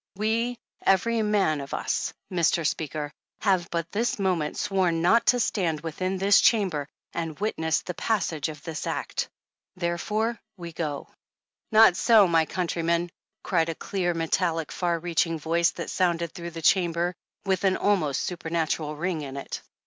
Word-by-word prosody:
We, 230 +4 0 0.3
every 225 +4 +3
man 200 -8 +2
of 140 - -5
us, - - -1 0.2
Mr. 170 -1 +2
Speaker, 150 -1 -2 0.3
have 185 -4 +2
but 170 0 -3
this 230 +4 0
moment 180 -6 0
sworn 185 -5 +1
not 225 +7 +4
to 245 - +5
stand 170 -9 0
within 185 +4 -2
this 200 +2 +5
Chamber 185 -11 +2 0.3
and 165 -1 -4
witness 160 -6 0
the 180 - -4
passage 170 -8 -1
of 150 -2 -9
this 160 -2 -5
act. - - -2 0.5
Therefore 210 +6 -1 0.2
we 170 -2 -8
go 150 -3 -4 0.3
" - - -57
^'Not 220 -4 +7
so, 215 -1 +6
my 165 -2 +3
countrymen," 170 -1 -1 0.3
cried 165 -3 +1
a 165 - -3
clear 175 -1 -2
metallic 165 -1 0
far 175 -2 0
reaching 165 0 0
voice 165 +2 +2
that 170 - -5
sounded 170 -3 0
through 170 -2 -7
the 165 - -6
Chamber 175 0 +2 0.3
with 190 -1 0
an 190 -1 +3
almost 175 -10 +1
supernatural 160 -3 -2
ring 170 0 -2
in 140 -1 -6
it. 140 - -5
170 Hz, 155 wpm, -26 LUFS, 160-195 Hz, 0.5 s, ^'Not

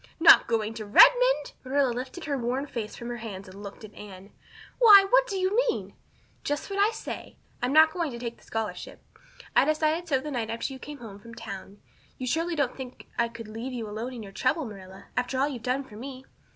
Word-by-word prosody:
"Not 330 - +8
going 225 -2 0
to 225 - -6
Redmond!" - - +6
Marilla 270 0 +1
lifted 255 +8 -6
her 285 - -1
worn 255 +2 -1
face 230 -6 -5
from 235 - -7
her 240 - -4
hands 200 -4 -7
and 190 +2 -11
looked 200 +2 -9
at 210 -1 -11
Anne. 195 -1 -11 0.5
"Why, 415 -5 +9
what - - +4
do 395 - -3
you 375 +2 0
mean?" - - -3 0.5
"Just 290 +7 -3
what 395 - -2
I 410 +2 +5
say. 450 -1 -7 0.2
I'm 250 +1 0
not 315 +2 +7
going 340 -4 -1
to 240 - -7
take 235 -1 -5
the - - -22
scholarship. 225 -1 -5 0.5
I - - +6
decided 310 +3 +1
so 280 -4 +2
the 300 +3 -6
night 235 -4 -2
after 230 +4 -3
you 265 - -9
came 295 +2 -8
home 215 -6 -10
from 230 +2 -12
town. 200 -3 -8 0.4
You 255 - -5
surely 330 +6 0
don't 285 -5 0
think 255 -2 -9
I 235 - +3
could 230 -1 -10
leave 225 +4 -6
you 230 -3 -4
alone 220 +5 -5
in 235 -3 -7
your 195 - -10
trouble, 255 - 0
Marilla, 190 -3 -11
after 250 +1 -1
all 275 +2 +2
you've 260 -6 -6
done 255 +4 -1
for 210 -5 -13
me. 260 +2 -8
250 Hz, 225 wpm, -27 LUFS, 225-300 Hz, 0.5 s, Why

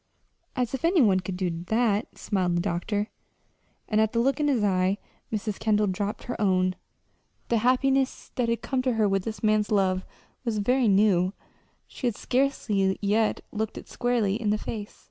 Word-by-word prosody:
"As 250 -2 -1
if 265 - -3
any 340 +2 +4
one 200 -8 +5
could 185 0 -5
do 175 -2 -2
that!" 220 -1 0
smiled 185 -4 0
the - - +2
doctor; 205 +4 -2 0.8
and 215 0 +2
at 220 -1 +1
the 230 - +1
look 270 +5 +2
in 295 - +2
his 255 -7 +2
eyes 190 0 +2 0.3
Mrs. 215 -2 -3
Kendall 210 -1 +2
dropped 200 +2 -2
her 245 - -5
own 185 -2 +2 0.7
the 235 - +3
happiness 265 +3 +1
that 245 -3 0
had 230 - -1
come 265 -2 0
to 255 -1 +1
her 220 -2 +2
with 195 -1 0
this 220 -2 -5
man's 215 -1 +2
love 190 -3 +2 0.4
was 230 -4 -1
very 245 +4 +2
new; 195 -2 +3 0.5
she 255 - -4
had 235 - -1
scarcely 225 -9 0
yet 215 +2 +1
looked 220 0 -3
it - - -9
squarely 235 -3 0
in 215 - 0
the 210 - +2
face. 210 -1 -6
215 Hz, 185 wpm, -26 LUFS, 195-240 Hz, 0.8 s, one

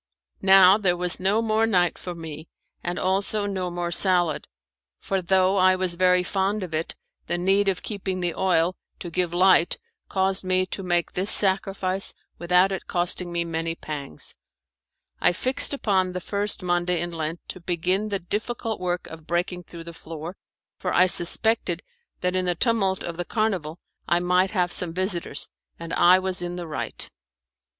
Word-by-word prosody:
Now 190 +1 +7
there 180 -4 +1
was 180 0 +2
no 200 +5 +1
more 220 0 +2
night 180 -6 +2
for 180 -1 -7
me, 160 -1 -8 0.4
and 175 +1 -3
also 200 +2 0
no 190 -3 -2
more 175 0 -3
salad, 175 -4 +3 0.5
for 195 -1 -2
though 190 +2 +2
I 185 0 +5
was 185 -1 -1
very 180 +1 +3
fond 195 +2 -1
of 175 -3 -7
it 160 +1 -3 0.3
the 175 - -1
need 195 +3 +2
of 190 -2 0
keeping 190 -3 -3
the 175 -2 -1
oil 180 -1 +1 0.2
to 175 - -7
give 175 0 0
light 180 -1 +4 0.3
caused 190 0 0
me 185 0 +1
to 190 - -5
make 175 -2 0
this 190 +3 -1
sacrifice 195 -1 0 0.2
without 180 +2 +3
it 190 - -5
costing 175 0 0
me 170 0 -1
many 165 0 -3
pangs. 145 - -6 0.9
I 175 - +3
fixed 255 +8 +2
upon 190 -9 0
the 180 - -3
first 200 +1 -1
Monday 175 0 +1
in 175 0 -2
Lent 165 0 -5
to 185 - -6
begin 180 +4 -1
the 200 - 0
difficult 220 +5 -4
work 180 -1 -2
of 160 -1 -11
breaking 175 +1 -2
through 170 -1 -9
the 170 0 -9
floor, 165 +2 -8 0.4
for 180 - -2
I 180 - +5
suspected 190 +5 +3 0.4
that 180 0 0
in 185 0 +1
the 175 -1 +1
tumult 195 -2 +1
of 170 -1 -5
the 175 - -1
carnival 190 -8 -1 0.3
I 175 - +3
might 180 +2 +2
have 180 -3 0
some 170 -2 -3
visitors, 185 -6 -2 0.3
and 165 0 -7
I 180 +1 +6
was 185 -1 -2
in 175 0 -4
the 175 -1 -5
right. 155 -2 -5
180 Hz, 175 wpm, -24 LUFS, 175-190 Hz, 0.9 s, Now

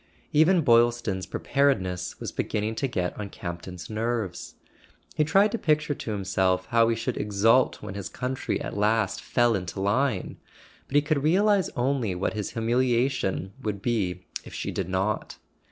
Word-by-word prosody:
Even 165 +4 +5
Boylston's 115 -6 +3
Preparedness 95 -11 0
was - - -5
beginning 105 +1 -2
to 135 +5 -1
get 90 -8 -2
on 100 -1 -4
Campton's 85 -1 -7
nerves. 110 -4 -3 0.6
He 155 - +2
tried 195 +7 +4
to 230 - -2
picture 155 -1 +1
to 115 - -6
himself 95 -2 0
how 115 -1 +4
he 115 - +2
should 115 0 -3
exult 105 +5 +2
when - - -6
his 100 -3 -5
country 130 +1 -3
at - - -5
last 105 0 +1
fell 120 -1 +2
into 95 -1 -3
line; 105 +2 0 0.5
but 140 - -6
he 145 - +5
could 150 -2 0
realize 195 +5 +3
only 125 -6 0
what 90 - -1
his 105 -2 -4
humiliation 120 -4 0
would 105 -4 -3
be 95 -7 -1 0.2
if - - -10
she - - -3
did 95 -1 -3
not. 95 +3 -1
115 Hz, 160 wpm, -26 LUFS, 95-135 Hz, 0.6 s, Even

